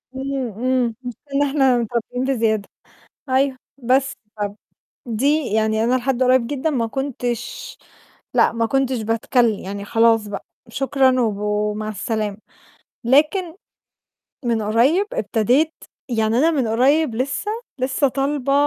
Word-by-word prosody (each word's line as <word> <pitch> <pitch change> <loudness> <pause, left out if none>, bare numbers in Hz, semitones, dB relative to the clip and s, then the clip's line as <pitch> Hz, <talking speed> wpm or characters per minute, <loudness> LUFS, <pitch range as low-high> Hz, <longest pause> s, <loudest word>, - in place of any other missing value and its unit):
إمم، 265 -2 -3
إمم، 245 0 0
مش 245 -1 -5
ده 280 - -24
اللي 285 +1 +3
إحنا 270 -3 +3
متربّيين 240 +2 -2
بزيادة 225 -6 0 0.6
أيوه. 265 0 +2 0.2
بس 265 +2 +2 0.3
طَب 205 0 -2 0.5
دي 280 +6 +1
يعني 220 0 +2
أنا 245 - +2
لحد 255 0 0
قريّب 255 -1 +4
جدًا 290 +4 -1
ما 245 -6 0
كنتش 265 - -4 0.6
لأ، - - +4
ما 230 0 0
كنتش 265 -1 0
باتكلِّم، 225 0 +1
يعني 200 +1 -6
خلاص 225 0 +3
بقى، 200 - -6 0.2
شكرًا 260 0 +2
وب 220 -4 +1
ومع 210 +1 -1
السلامة. 215 -1 -2 0.7
لكن 305 - +2 0.9
من 230 -2 +1
قريّب 250 - +3
ابتديت 280 - +1 0.4
يعني 225 -1 +1
أنا 320 +4 +4
من 270 -8 0
قريّب 260 +4 +3
لسّه 265 - -2 0.3
لسّه 265 +2 +1
طالبة 275 0 -1
250 Hz, 130 wpm, -21 LUFS, 225-275 Hz, 0.9 s, قريّب